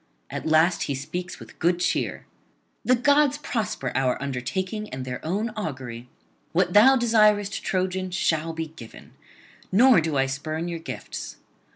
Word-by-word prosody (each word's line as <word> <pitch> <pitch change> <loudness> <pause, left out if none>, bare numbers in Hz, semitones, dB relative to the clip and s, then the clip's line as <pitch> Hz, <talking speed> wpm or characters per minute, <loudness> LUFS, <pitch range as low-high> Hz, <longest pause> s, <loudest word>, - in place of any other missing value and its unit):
At - - -4
last 160 +3 +3
he 140 - -2
speaks 175 +7 -5
with - - -14
good 175 +1 +2
cheer: - - -1 0.6
'The 255 - +5
gods 285 +3 +3
prosper 220 - -3
our 130 -1 +1
undertaking 180 - -3
and 130 0 -6
their 125 -1 -6
own 205 +8 -1
augury! 130 - -6 0.4
What 175 +1 +2
thou 245 +6 +7
desirest, 215 -4 +3
Trojan, 185 0 -1
shall 165 -3 0
be 165 0 -4
given; 120 -8 -13 0.6
nor 235 +1 +6
do 155 -2 -1
I 135 - +3
spurn 155 +5 -3
your 170 -1 -4
gifts. 165 - -7
175 Hz, 150 wpm, -25 LUFS, 140-210 Hz, 0.6 s, thou